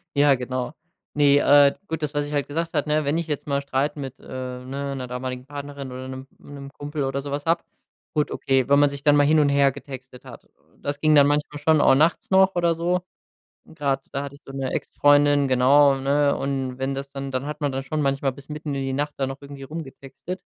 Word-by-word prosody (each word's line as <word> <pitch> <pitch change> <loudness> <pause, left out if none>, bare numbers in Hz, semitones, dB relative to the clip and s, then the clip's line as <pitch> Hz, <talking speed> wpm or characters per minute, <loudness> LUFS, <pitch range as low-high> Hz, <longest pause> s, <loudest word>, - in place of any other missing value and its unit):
Ja, 140 -1 +5
genau. 125 +2 -4 0.4
Ne, 145 -1 +4
äh, 145 0 +6
gut, 160 -1 -4
das 150 0 -2
was 145 0 0
ich 150 - -7
halt 145 -1 0
gesagt 165 +3 -3
hatte, 150 0 +1
wenn 145 +3 +1
ich 170 -1 -2
jetzt 150 -1 -4
mal 140 0 0
Streit 140 +2 -1
mit, 135 -2 -6
äh, - - -20
ne, 130 +2 -5
'ner 130 -1 -5
damaligen 125 0 -5
Partnerin 140 -2 -7
oder 130 +1 -7
'nem 140 +1 -10
Kumpel 145 0 -4
oder 135 +1 -2
so 140 0 -7
was 145 +1 -3
habe 165 +1 +1 0.5
gut, 150 -1 +1
okay, 135 -2 0
wenn 140 0 +5
man 145 -1 +5
sich 140 0 -8
dann 145 0 +6
mal 145 0 +5
hin 155 +1 +4
und 145 - +4
her 140 -1 +4
getextet 130 -2 -11
hat. - - -12 0.3
Das 145 0 -4
ging 155 0 +4
dann 140 -1 +7
manchmal 145 0 -1
schon 155 +1 +3
auch 135 - +5
nachts 160 +5 +2
noch 190 0 +4
oder 170 -1 +2
so. 175 +2 0 0.6
Und 160 - -18
gerade 135 -2 0
da 140 0 -2
hatte 140 0 -8
ich 140 - -17
so 135 - -10
'ne 135 -1 -3
Ex - - -3
Freundin, 145 -1 +5
genau, 135 +2 +5
ne? 140 +1 +2
Und 135 -2 -3
wenn 135 +1 -2
das 140 0 -6
dann 135 -1 -6
dann 130 +2 -3
hat 150 +1 -6
man 140 -2 0
dann 135 0 -3
schon 150 +2 -2
manchmal 135 -1 0
bis 135 +2 -15
mitten 150 -1 -4
in 135 - -2
die 135 0 -2
Nacht 145 +2 -2
da 135 - 0
noch 135 +1 -6
irgendwie 140 -1 -10
rumgetextet. 140 +3 -8
140 Hz, 235 wpm, -23 LUFS, 135-145 Hz, 0.6 s, dann